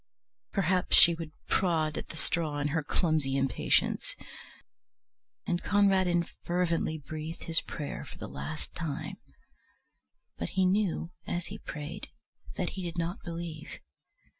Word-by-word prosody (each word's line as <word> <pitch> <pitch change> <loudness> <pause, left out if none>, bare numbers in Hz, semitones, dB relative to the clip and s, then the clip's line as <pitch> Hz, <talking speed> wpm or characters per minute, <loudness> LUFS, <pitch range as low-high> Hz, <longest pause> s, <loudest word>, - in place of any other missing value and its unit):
Perhaps 185 -1 +3
she 170 - +10
would 165 -2 -5 0.2
prod 160 -5 +2
at - - -5
the 160 - -8
straw 155 -3 0
in 145 0 0
her 160 +2 +1
clumsy 150 -3 +1
impatience. 135 -3 +1 1.3
And 175 - 0
Conradin 190 -4 +4 0.2
fervently 170 -2 +1
breathed 155 +2 -6
his 165 -1 +2
prayer 150 -3 -5
for - - -11
the - - -6
last 155 -1 -6
time. 160 -4 -4 1.2
But 85 - -2
he 190 - +5
knew 185 -3 +1 0.2
as 175 0 -1
he - - -7
prayed 150 -1 -6 0.5
that 180 - -1
he 190 - -5
did 175 -1 -4
not 170 +2 -1
believe. 165 -2 -5
165 Hz, 135 wpm, -30 LUFS, 155-180 Hz, 1.3 s, she